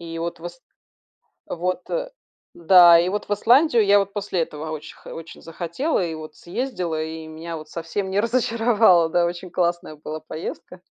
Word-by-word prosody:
и 165 -1 -7
вот 170 0 -4
вос 175 +1 -9 0.9
вот, 180 +1 -3
э - - -3 0.4
да. 175 0 +7
И 175 - +1
вот 210 +1 -3
в - - -9
Исландию 240 +2 +4
я 200 0 +5
вот 195 0 -3
после 200 -4 -2
этого 155 0 -5
оч 150 - -10
х - - -12
очень 165 0 -10
захотела 175 - -2
и 165 - -4
вот 155 -1 -10
съездила, 180 -6 -3
и 160 0 -7
меня 165 +1 -7
вот 155 -1 -11
совсем 170 +4 -4
не 195 - 0
разочаровало, 225 -6 +3
да. 175 +1 +2
Очень 175 +1 -5
классная 175 -2 -1
была 155 +1 -7
поездка. 165 +3 -8
175 Hz, 175 wpm, -22 LUFS, 165-205 Hz, 0.9 s, да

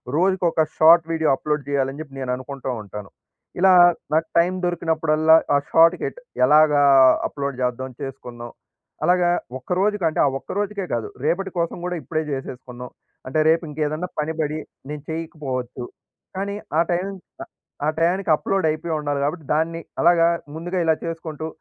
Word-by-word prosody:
రోజుకొక 175 -1 +2 0.2
short 165 +1 +7
video 160 -1 +1
upload 150 0 -3
జేయాలని 140 0 -1
జెప్పి 140 -3 -10
నేను 125 - -2
అనుకుంటూ 135 0 -7
ఉంటాను. 105 0 -9 0.5
ఇలా 190 +1 +6 0.4
నాకు 160 +1 +2
టైం 175 +2 +2
దొరికినప్పుడల్లా, 160 -2 +2 0.2
ఆ - - +6
షార్ట్‌ 165 +2 +6
కెట్ - - -4 0.3
ఎలాగా 150 +1 +5 0.5
అప్‌లోడ్ 140 -2 -4
చేద్దాం 130 +1 -2
చేసుకుందాం. 120 -3 -8 0.5
అలాగా 175 +1 +3 0.3
ఒక్కరోజుకంటే, 180 +2 0
ఆ - - +4
ఒక్కరోజుకే 200 +6 -3
గాదు. 115 -2 -2 0.2
రేపటి 190 +5 0
కోసం 170 +1 -1
గూడా 180 0 -2
ఇప్పుడే 155 0 -2
జేసేసుకున్నాం. 125 -2 -7 0.4
అంటే, 145 +4 0
రేపింకేదన్నా 155 0 -1
పని 155 +1 -1
బడి 155 0 -1 0.3
నేను 150 -1 -6
చేయకపోవచ్చు. 135 -7 -5 0.5
కానీ 200 +1 -3 0.2
ఆ - - +6
టైం 180 +2 0
క - - -19 0.6
ఆ 150 - +1
టైయానికి 175 +2 +1
అప్‌లోడయిపోయుండాలి 155 -5 -1
గాబట్టి, 150 +3 -2
దాన్ని 165 +2 -1 0.2
అలాగా 170 -1 +5 0.3
ముందుగా 175 +3 -4
ఇలా 160 -1 +3
చేసుకుంటూ 160 -2 -5
160 Hz, 135 wpm, -22 LUFS, 140-170 Hz, 0.6 s, షార్ట్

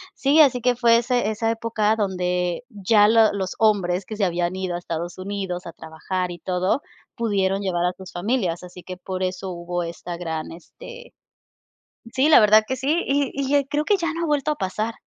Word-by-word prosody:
Sí, 285 +3 +3
así 260 -4 +4
que 250 +1 +2
fue 235 -1 +4
ese 240 -2 0
esa 225 +1 -1
época 225 -2 0
donde 180 -2 -1
ya 210 -1 +3
lo 225 0 +5
los 190 -2 -3
hombres 195 -4 +2
que 215 +1 -7
se 200 - +2
habían 175 0 -1
ido 185 -2 -3
a - - -3
Estados 170 0 -5
Unidos, 190 -2 -4
a 170 - -7
trabajar, 175 +3 -4
y 175 - -8
todo, 185 - 0 0.3
pudieron 195 -4 0
llevar 175 -3 -1
a 180 - 0
sus 190 -1 -11
familias, 180 -2 -1
así 180 0 -11
que 185 -1 -8
por 185 +1 -5
eso 185 +1 -3
hubo 175 0 -4
esta 170 +1 -6
gran 160 -2 -4
este 485 - -12 1.0
Sí, 270 +3 +2
la 310 - +8
verdad 215 +1 +6
que 260 - -2
sí, 290 +7 0
y 280 -1 +1
y 280 +1 +1
creo 295 +2 -1
que 415 - +3
ya 335 -3 -2
no 335 - -3
ha - - -1
vuelto 295 0 0
a - - -5
pasar. 215 +3 -3
200 Hz, 205 wpm, -23 LUFS, 180-240 Hz, 1.0 s, la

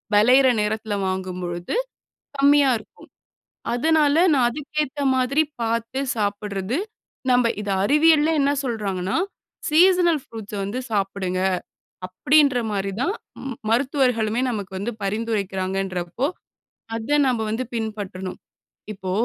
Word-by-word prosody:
வெளையிற 250 +6 +6
நேரத்தில 215 0 -2
வாங்கும்பொழுது 180 - -3 0.6
கம்மியா 280 0 +5
இருக்கும். 215 - -17 0.7
அதனால 300 +3 +3 0.2
நா 275 - +3
அதுக்கேத்த 295 +1 -3
மாதிரி 260 +4 +2 0.2
பார்த்து 230 +3 -1 0.2
சாப்பிட்றது. 205 +1 -2 0.5
நம்ப 250 -1 +4 0.2
இத 205 - -5
அறிவியல்ல 305 +5 +4
என்ன 280 0 +3
சொல்றாங்கன்னா, 200 - -2 0.5
"சீசனல் 345 -1 +4
ப்ரூட்ஸ 220 -3 -9
வந்து 205 +6 -3
சாப்புடுங்க." 195 -3 -1 0.7
அப்படீன்ற 280 +8 +3
மாரி 195 -1 -2
தான் 365 +9 +1 0.3
ம் 265 -2 -5 0.2
மருத்துவர்களுமே 250 -3 +1
நமக்கு 205 -5 -5
வந்து 230 +5 -3
பரிந்துரைக்கிறாங்கன்றப்போ, 195 -1 -2 0.7
அத 290 +7 +1
நம்ப 245 -3 +1
வந்து 240 +4 -2
பின்பற்றணும். 205 -4 -5 0.6
இப்போ 190 -1 -6
225 Hz, 105 wpm, -23 LUFS, 195-275 Hz, 0.7 s, வெளையிற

